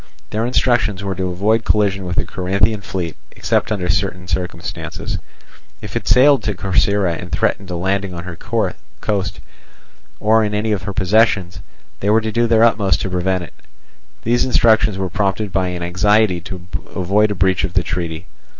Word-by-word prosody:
Their 110 +2 0
instructions 120 -6 +1
were 100 -1 -2
to 95 0 -2
avoid 105 +5 +1
collision 100 -3 +1
with 90 0 -3
the - - +1
Corinthian 100 +3 0
fleet 90 -4 -4 0.2
except - - 0
under 95 -4 -1
certain 90 0 -1
circumstances. 85 0 -4 0.6
If - - -9
it - - -3
sailed 135 0 +6
to 105 -1 -2
Corcyra 95 0 +1
and 90 +2 -7
threatened 95 -1 0
a 90 - -3
landing 95 +2 -1
on 85 - -6
her 90 -1 -7
coast, 95 - -3 0.8
or 110 +1 +3
in 105 -1 -1
any 110 +1 0
of 105 - 0
her 100 - -3
possessions, 95 -2 +2 0.4
they 100 - -1
were 110 +1 +5
to 110 0 -3
do 120 +1 +2
their 115 0 +4
utmost 100 -6 +3
to 95 - -3
prevent 90 0 0
it. 85 - -11 0.7
These 120 +2 +2
instructions 110 -5 +3
were 95 -1 -1
prompted 100 +2 -1
by 95 0 +1
an 90 -1 -4
anxiety 95 +1 +2
to 90 +1 -8 0.3
avoid 100 +4 +2
a 105 - -2
breach 95 0 +2
of 90 - -2
the 95 - +3
treaty. 85 -1 -4
95 Hz, 175 wpm, -19 LUFS, 90-105 Hz, 0.8 s, sailed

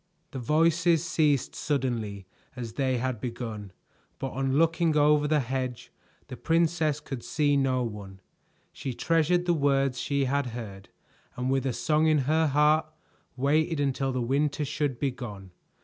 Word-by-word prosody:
The 130 - -5
voices 165 +5 +2
ceased 150 -6 +1
suddenly 115 -9 -2 0.3
as 120 -3 -6
they 130 -1 0
had 125 -2 -3
begun, 115 -5 -5 0.5
but 135 - -4
on 135 +1 -1
looking 165 0 +2
over 150 0 +4
the 150 -1 +2
hedge, 130 -1 -4 0.3
the 130 - -8
princess 165 -1 +1
could 135 -4 -7
see 145 -2 +1
no 130 -2 +1
one. 100 -4 -7 0.5
She 130 -3 -5
treasured 165 +2 +2
the 175 - +3
words 135 -4 +1
she 140 -1 0
had 140 +1 0
heard, 100 -5 -9 0.5
and 125 +1 -2
with 135 0 +1
a - - +1
song 155 +4 +1
in 155 -1 +4
her 160 +1 +3
heart, 150 +2 +3 0.5
waited 155 +4 +1
until 135 -1 0
the 125 -1 -1
winter 145 +4 0
should 140 -2 -2
be 135 +1 0
gone. 100 -7 -9
140 Hz, 155 wpm, -27 LUFS, 125-155 Hz, 0.5 s, over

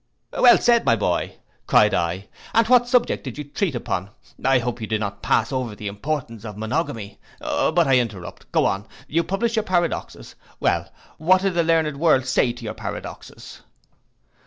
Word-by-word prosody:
'Well 245 -1 +7
said, 235 -1 +3
my 115 - +3
boy,' 95 -5 -1 0.3
cried 105 -1 +4
I, 90 +3 -1 0.3
'and 230 - +5
what 245 0 +5
subject 245 -1 +1
did 130 -2 -7
you 150 - -4
treat 145 +2 -2
upon? 100 -5 -3 0.3
I 135 0 +4
hope 120 -1 -3
you 110 - -4
did 110 0 -1
not 100 -1 -4
pass 110 0 +1
over 125 -5 -3
the 105 - -10
importance 115 +2 -4
of 105 -3 -8
Monogamy. 110 -2 -3 0.2
But 170 +1 +1
I 130 -2 +5
interrupt, 105 -7 -6
go - - +2
on; 100 +1 -1 0.2
you 165 +3 +1
published 225 +5 -1
your - - +4
paradoxes; 175 - -2 0.3
well, - - 0 0.3
and 155 - -11
what 185 +1 +5
did 195 -2 +1
the 170 - +2
learned 160 -3 +1
world 145 -5 +3
say 125 -1 +2
to 120 0 -11
your 110 - -4
paradoxes? - - -8
130 Hz, 185 wpm, -22 LUFS, 105-170 Hz, 0.3 s, Well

